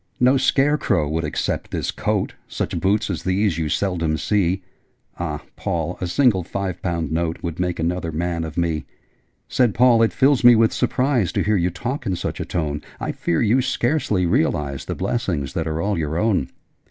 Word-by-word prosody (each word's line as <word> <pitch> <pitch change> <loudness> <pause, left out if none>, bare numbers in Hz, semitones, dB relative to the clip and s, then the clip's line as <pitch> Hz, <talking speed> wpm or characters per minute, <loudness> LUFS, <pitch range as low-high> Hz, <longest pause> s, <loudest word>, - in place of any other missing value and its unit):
'No 125 +2 +5
scare 135 +3 +3
crow 85 -8 +1
would 80 +2 -1
accept 75 - -2
this - - -2
coat: - - -1
Such - - -3
boots 105 +3 +1
as 85 -3 -3
these 95 -2 +1
you 80 -2 -1
seldom 85 -5 0
see. 95 -1 0 0.6
Ah, 75 -4 -3
Paul, 85 +1 -3
a 90 - -1
single 110 -1 +3
five 95 0 -4
pound 85 -4 -2
note 85 0 -2
Would 85 -1 -4
make 90 -1 -1
another 85 0 -1
man 85 +1 -2
of 80 -1 -7
me!' 85 -3 0 0.6
Said 120 -5 +2
Paul 120 -1 +5
'It 115 - +4
fills 135 -1 +3
me 120 0 +9
with 110 0 +3
surprise 125 - +1
To - - +1
hear 105 0 +2
you 90 -2 +2
talk 120 - -4
in 95 - 0
such - - -4
a - - -3
tone: 75 -4 -2 0.2
I - - -2
fear 85 - 0
you 120 +4 +3
scarcely 120 - 0
realise 70 -4 0
The - - -3
blessings 85 - -2
that 80 -1 -2
are 80 0 -2
all 100 +1 0
your 80 0 -2
own! 95 -8 +1
90 Hz, 190 wpm, -22 LUFS, 80-115 Hz, 0.6 s, me